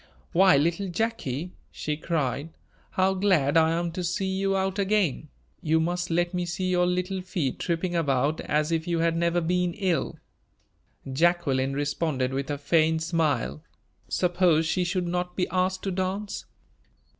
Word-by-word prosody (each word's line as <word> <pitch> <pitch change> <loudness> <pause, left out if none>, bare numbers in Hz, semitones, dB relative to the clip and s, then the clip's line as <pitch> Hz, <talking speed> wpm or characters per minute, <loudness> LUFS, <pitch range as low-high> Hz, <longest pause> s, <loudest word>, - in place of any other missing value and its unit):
"Why, 185 -2 +6
little 170 +7 +1
Jacky," 180 - -2 0.2
she 150 - -3
cried, 150 -2 -2 0.4
"how 190 +1 +2
glad 185 -7 +2
I 160 -1 +5
am 170 0 -1
to 180 +2 -4
see 180 +3 -1
you 195 +1 0
out 190 +1 -1
again! 195 -7 +1 0.3
You 160 0 +2
must 175 +2 -1
let 175 +1 +1
me 180 0 -1
see 185 +1 -2
your 180 0 +3
little 180 +1 -1
feet 175 -7 -2
tripping 175 +1 -1
about 145 -1 +1
as 150 +1 0
if 165 +1 -1
you 170 -1 0
had 165 0 +1
never 170 +1 +1
been 180 +1 0
ill." 185 -5 -1 1.0
Jacqueline 140 -4 +2
responded 145 -2 -1
with 135 +1 -3
a 145 - -1
faint 160 +2 +2
smile. 160 -3 0 0.5
Suppose 175 -3 +2
she 180 +3 +1
should 180 0 -1
not 180 0 -2
be 180 - 0
asked 185 0 0
to 195 - -1
dance? 190 +3 -3
175 Hz, 155 wpm, -26 LUFS, 160-185 Hz, 1.0 s, Why